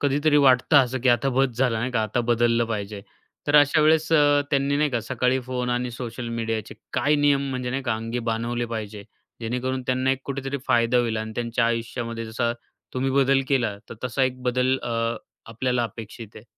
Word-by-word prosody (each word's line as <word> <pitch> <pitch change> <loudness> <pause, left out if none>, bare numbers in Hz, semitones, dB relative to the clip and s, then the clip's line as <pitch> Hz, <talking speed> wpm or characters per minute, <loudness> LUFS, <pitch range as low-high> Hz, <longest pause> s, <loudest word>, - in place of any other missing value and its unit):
कधीतरी 145 +2 +2
वाटतं 135 +1 +5
असं 130 -2 +4
की 130 - +3
आता 120 +3 +3
बस 135 -3 +2
झाला 125 -4 +2
नाही 130 +3 -2
का 110 -2 +1
आता 110 +3 -1
बदललं 120 0 +2
पाहिजे. 105 -2 -4 0.5
तर 145 +1 +4
अशा 145 +2 +5
वेळेस 160 +1 +3
अ, 145 -2 +5
त्यांनी 140 0 +1
नाही 150 0 +1
का 120 - -1
सकाळी 125 +3 0
फोन 125 -1 -2
आणि 120 0 -1
सोशल 120 0 -6
मीडियाचे 115 -2 -3 0.2
काय 150 - +2
नियम 145 -1 +2
म्हणजे 125 -1 -3
नाही 135 +1 -2
का 120 -3 0
अंगी 115 +2 -4
बानवले 120 +1 -2
पाहिजे? 105 -3 -6 0.4
जेणेकरून 125 +3 -2
त्यांना 130 +1 +1
एक 135 0 -1
कुठेतरी 140 0 -4
फायदा 120 -1 +3
होईल 115 -2 0
आणि 110 0 -4
त्यांच्या 115 0 0
आयुष्यामध्ये 115 0 -3
जसा 115 +1 -1 0.4
तुम्ही 130 +1 0
बदल 135 0 +3
केला 120 -7 +1
तर - - -8
तसा 130 +1 -1
एक 130 0 -3
बदल 125 +1 +1
अ, 115 -1 -1 0.3
आपल्याला 120 +2 -1
अपेक्षित 110 0 -8
आहे. 110 - -12
125 Hz, 190 wpm, -24 LUFS, 115-135 Hz, 0.5 s, वाटतं